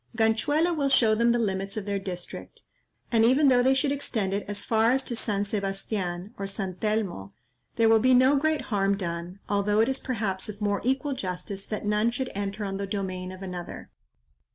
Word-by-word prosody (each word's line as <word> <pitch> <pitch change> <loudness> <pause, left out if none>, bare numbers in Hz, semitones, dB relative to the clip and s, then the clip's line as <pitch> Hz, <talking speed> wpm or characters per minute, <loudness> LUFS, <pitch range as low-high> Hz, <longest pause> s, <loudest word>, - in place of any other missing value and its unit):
Ganchuelo 290 +10 +2
will 280 -3 +1
show 230 -5 +4
them 235 +2 +3
the 240 - +2
limits 195 -2 -1
of 210 - -3
their 200 -1 -1
district, 180 -2 -7 0.5
and 225 -2 +4
even 270 +5 +5
though 250 -1 +5
they 265 +2 +4
should 275 +1 +1
extend 220 -8 -1
it 200 - -1
as 205 -1 -3
far 225 0 +3
as 265 +2 +2
to 240 - -3
San 205 -3 -1
Sebastian, 195 -1 -3
or 195 - -3
Santelmo, 195 - -2 0.4
there 230 - +4
will 225 0 +6
be 255 +3 +4
no 260 +3 +5
great 310 +2 +1
harm 195 0 +2
done, 170 0 -5
although 205 +1 +1
it 225 - +4
is 265 0 -1
perhaps 215 -6 -2
of 210 -1 -7
more 205 -1 0
equal 265 +3 0
justice 190 -2 -5
that 215 -1 -4
none 210 +2 +2
should 255 +2 -3
enter 205 +1 -3
on 195 -1 -3
the 200 0 -3
domain 185 -2 -3
of 185 +1 -9
another." 180 -2 -7
210 Hz, 200 wpm, -27 LUFS, 195-240 Hz, 0.5 s, will